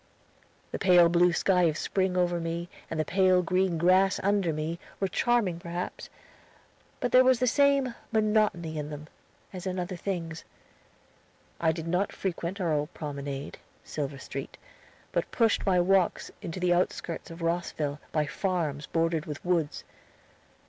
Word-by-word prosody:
The - - -3
pale 180 -3 +6
blue 175 +1 +4
sky 180 0 +3
of 155 -2 +1
spring 185 +1 0
over 175 -1 +1
me, 170 +1 -3 0.2
and 160 - -3
the 155 - +1
pale 185 +1 +3
green 185 0 +1
grass 185 +3 +4
under 200 -3 +2
me, 155 +2 -3 0.2
were 195 - +1
charming 210 -5 +1
perhaps; 175 +1 -5 0.9
but 245 - -1
there 255 0 +7
was 255 -1 +5
the 255 - +1
same 275 0 +3 0.2
monotony 210 -8 +1
in 150 0 -4
them, 150 0 -7 0.5
as 185 0 -6
in 185 0 -2
other 180 +1 -3
things. 170 -3 -4 1.2
I 160 - +3
did 165 0 -5
not 180 +4 0
frequent 185 +1 -4
our 170 -4 +1
old 150 +2 -1
promenade, 140 -2 -5 0.2
Silver 140 -2 -4
Street, - - -7 0.5
but - - -1
pushed 225 -3 +1
my 185 -2 +4
walks 185 0 +2
into 170 +1 -5
the 180 -1 +3
outskirts 175 -1 -2
of 165 0 -8
Rosville, 165 -4 -1
by 155 -1 +1
farms 155 -4 -2
bordered 165 -1 0
with 150 +1 -7
woods. 170 -5 0
175 Hz, 155 wpm, -28 LUFS, 160-190 Hz, 1.2 s, there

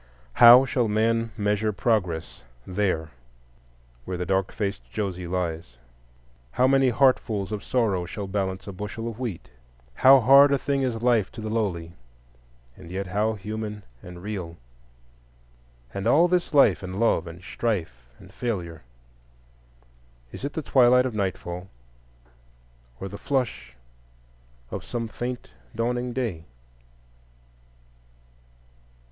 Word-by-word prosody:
How 120 - +9
shall 125 -3 0
man 115 +2 +1
measure 105 +1 0
Progress 90 -4 -1 0.2
there 90 -5 -1 0.9
where 90 +5 -5
the 90 - -3
dark 95 +1 0
faced 100 -2 -4
Josie 95 -4 -3
lies? 85 -7 -4 0.8
How 125 - +3
many 135 -1 +4
heartfuls 115 -6 +1
of 105 -2 -4
sorrow 100 -8 0
shall 100 +3 -5
balance 95 -1 -3
a 100 - -6
bushel 105 +4 -6
of 115 0 -7
wheat? 115 -10 -5 0.5
How 135 - +7
hard 140 +4 +7
a 140 - +3
thing 140 0 -1
is 120 -3 -2
life 115 -5 +2
to 115 - -8
the 110 0 -4
lowly, 90 -7 -2 0.8
and 90 -2 -13
yet 95 +2 -4
how 105 +4 0
human 105 0 -6 0.2
and 90 0 -11
real! 90 -5 -5 1.4
And 100 +2 -3
all 160 +8 +5
this 175 -1 0
life 145 -3 +5
and 95 +1 -6
love 115 -6 +2
and 85 +1 -9
strife 80 - -3
and - - -16
failure,—is - - -10
it 140 - -3
the 160 - -4
twilight 125 -1 +5
of 125 - -3
nightfall 95 -2 -4 1.3
or 95 - -5
the 100 +1 -9
flush 125 - -2 1.0
of - - -5
some 115 -2 -4
faint 120 - -6 0.2
dawning 120 +1 -1
day? 115 -10 -3
105 Hz, 125 wpm, -25 LUFS, 85-120 Hz, 1.4 s, How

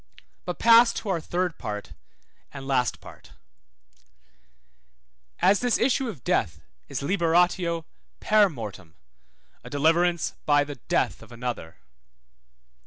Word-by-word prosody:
But 180 - -4
pass 230 +1 +6
to 215 - -5
our 180 -3 0
third 175 +1 -2
part 105 -3 -6 0.6
and 135 -1 -9
last 125 -3 0
part: - - -14 2.0
As 190 +3 +3
this 245 -2 +1
issue 260 0 +1
of 155 - -9
death - - 0 0.3
is - - -5
liberatio 170 0 +1 0.3
per 210 -2 +4
mortem, 105 - -9 0.7
a - - -10
deliverance 165 +4 +1
by 145 -1 +4
the 145 -1 -8
death - - 0
of 115 +1 -15
another. 120 -8 -6
165 Hz, 115 wpm, -25 LUFS, 135-190 Hz, 2.0 s, pass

